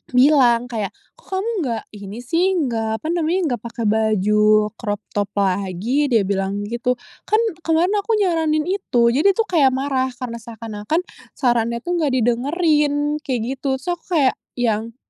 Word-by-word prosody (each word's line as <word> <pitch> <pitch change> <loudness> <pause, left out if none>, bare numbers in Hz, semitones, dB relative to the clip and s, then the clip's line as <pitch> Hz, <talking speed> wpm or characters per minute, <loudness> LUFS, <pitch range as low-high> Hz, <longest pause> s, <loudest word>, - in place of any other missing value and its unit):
bilang 250 -3 +4
kayak, 215 -5 -3 0.2
"Kok - - -23
kamu 390 +5 -1
nggak 230 -5 -2 0.2
ini 200 +3 -8
sih," 350 +9 +1
nggak 225 -8 -1
apa - - -3
namanya, 345 +1 +1 0.2
"nggak 225 - -14
pakai 235 0 -5
baju 210 0 +3
crop 205 -2 -3
top 205 -1 -1
lagi?" 200 +8 0
dia 225 -4 +4
bilang 195 +1 -1
gitu, 235 +4 -1 0.3
"Kan - - +2 0.3
kemarin 330 +3 +2
aku 440 +3 0
nyaranin 325 -6 +1
itu," 240 -12 +2
jadi 320 +10 +3
tuh 455 - +2
kayak 310 -6 +5
marah 265 -1 0
karena 240 -2 -6
seakan-akan 225 - -3 0.3
sarannya 235 -2 0
tuh 350 0 -1
enggak 300 -4 +1
didengerin 290 +4 +1
kek 255 -6 -2
gitu. 265 +2 -2
Terus 265 - -11
aku - - -37 0.2
kayak 265 -2 +3 0.2
yang, 230 -2 -1
245 Hz, 160 wpm, -20 LUFS, 220-305 Hz, 0.3 s, kayak